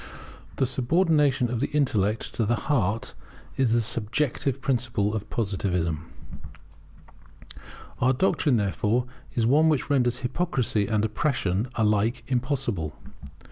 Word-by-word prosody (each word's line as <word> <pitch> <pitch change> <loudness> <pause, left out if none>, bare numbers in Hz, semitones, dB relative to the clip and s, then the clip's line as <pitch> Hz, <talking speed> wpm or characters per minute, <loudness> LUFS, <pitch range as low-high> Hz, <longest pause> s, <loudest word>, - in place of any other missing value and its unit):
[The 135 - +1
subordination 135 -1 +2
of 120 - -1
the 140 - 0
intellect 115 -8 0
to 115 - 0
the 120 - +2
heart 115 -6 -1 0.4
is 130 -4 +1
the 120 0 +3
Subjective 120 +5 -1
Principle 120 -6 0
of 105 -1 -4
Positivism] 90 -7 -2 1.9
Our 130 +1 +3
doctrine, 140 -3 +2
therefore, 105 +4 0 0.3
is 115 - +1
one 150 +6 +4
which 150 -1 0
renders 125 -3 +1
hypocrisy 125 - 0
and 110 -1 +1
oppression 110 -4 -1
alike 110 +2 +1
impossible. 125 - -2
120 Hz, 115 wpm, -26 LUFS, 105-135 Hz, 1.9 s, one